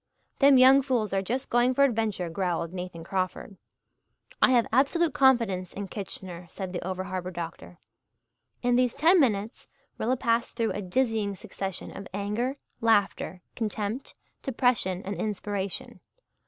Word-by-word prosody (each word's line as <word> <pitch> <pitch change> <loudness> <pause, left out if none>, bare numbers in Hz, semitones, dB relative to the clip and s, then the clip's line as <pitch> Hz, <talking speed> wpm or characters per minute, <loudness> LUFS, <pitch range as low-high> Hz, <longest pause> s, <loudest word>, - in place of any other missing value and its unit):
"Them 275 -1 +7
young 260 +2 +8
fools 245 -7 -1
are 195 - +2
just 245 +7 -3
going 245 +2 +3
for 280 - +5
adventure," 220 -8 +1
growled 170 -1 -2
Nathan 180 -2 -6
Crawford. 185 +2 -3 0.9
"I - - +7
have 245 -3 +4
absolute 290 +5 +3
confidence 230 -9 +3
in 200 -1 -5
Kitchener," 180 -3 -7
said 190 -2 -6
the 175 - -3
over 185 +1 -3
harbour 185 -1 -4
doctor. 165 - -7 0.9
In 245 0 +3
these 250 -2 +2
ten 335 +5 +5
minutes 215 -6 0 0.3
Rilla 250 +4 +1
passed 230 0 0
through 230 -2 0
a 205 - -3
dizzying 215 0 0
succession 195 -2 -6
of 195 - -7
anger, 210 +6 -1 0.3
laughter, 200 -5 +1
contempt, 215 +2 -3 0.3
depression 235 -8 +1
and 200 - -3
inspiration. 205 -2 -3
210 Hz, 140 wpm, -27 LUFS, 185-245 Hz, 0.9 s, young